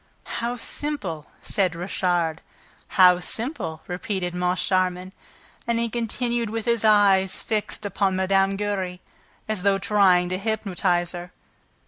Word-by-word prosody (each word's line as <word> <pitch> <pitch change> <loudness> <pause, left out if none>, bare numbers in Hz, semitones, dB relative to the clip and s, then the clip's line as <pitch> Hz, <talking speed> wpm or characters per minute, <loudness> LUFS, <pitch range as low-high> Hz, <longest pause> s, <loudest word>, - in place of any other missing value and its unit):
"How 240 +1 -1
simple!" 210 - -4 0.2
said 185 -4 0
Richard. 175 -2 0 0.6
"How 180 -1 +7
simple!" 185 - -3
repeated 180 0 -3
Moncharmin. 180 +1 0 0.5
And 235 -1 +1
he 230 -1 -1
continued 235 0 -1
with 225 0 -4
his 235 -2 +2
eyes 200 -3 +4
fixed 215 -1 -3
upon 195 -1 0
Mme. 195 +1 +2
Giry, 195 -3 -2 0.5
as 215 -4 -2
though 200 0 +3
trying 190 -3 +3
to 185 +1 -2
hypnotize 195 -5 0
her. 175 0 -8
190 Hz, 120 wpm, -24 LUFS, 180-215 Hz, 0.6 s, How